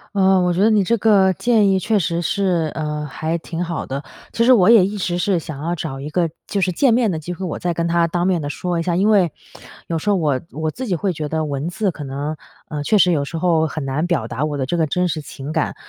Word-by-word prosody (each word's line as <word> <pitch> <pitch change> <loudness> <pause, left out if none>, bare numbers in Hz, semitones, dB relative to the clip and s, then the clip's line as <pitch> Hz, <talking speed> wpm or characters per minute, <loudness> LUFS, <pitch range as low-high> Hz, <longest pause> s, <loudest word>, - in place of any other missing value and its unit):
呃， 190 -1 +4
我 180 -1 +1
觉 180 - 0
得 215 - +5
你 215 -2 +4
这 230 +5 +1
个 195 -3 +4
建 220 +1 +2
议 190 - +3
确 210 +2 +1
实 170 -1 -1
是， 170 -1 0
呃， 150 -1 -3
还 160 +3 -3
挺 165 0 -6
好 170 -1 -4
的， 135 +1 -4 0.3
其 230 - +1
实 255 - +7
我 205 -4 +5
也 225 -5 +7
一 205 +2 -4
直 175 -2 -1
是 185 +1 +1
想 150 -3 -8
要 170 +3 -1
找 150 -5 -5
一 140 +2 -6
个 170 +1 0 0.2
就 200 - -1
是 185 - +1
见 240 +7 +3
面 230 -3 +2
的 160 - -3
机 175 +3 -6
会， 185 +2 -5
我 170 - -4
再 175 -1 -1
跟 170 0 -1
她 170 0 +2
当 175 +1 -1
面 180 -3 +1
地 145 - -4
说 175 +3 -2
一 - - 0
下， 170 0 0
因 195 +4 +2
为 195 -5 +4 0.6
有 165 - -1
时 210 - -2
候 205 - +4
我 150 -7 +1
我 155 +1 -2
自 260 +7 -6
己 185 - 0
会 190 +4 -1
觉 155 -3 -4
得 160 +1 -1
文 145 0 -3
字 190 +3 -1
可 150 -3 -8
能， 140 +3 -4 0.4
呃， 150 -2 -4
确 210 +9 +2
实 185 -2 +5
有 145 -4 +1
时 165 - -5
候 160 -2 +2
很 155 0 -5
难 135 +5 -1
表 170 -10 0
达 130 +5 -2
我 150 -1 -3
的 135 - -1
这 175 +7 -2
个 160 -2 +1
真 180 +5 0
实 155 - -2
情 145 -1 -8
感， 160 -1 -1
170 Hz, 300 characters per minute, -20 LUFS, 155-190 Hz, 0.6 s, 实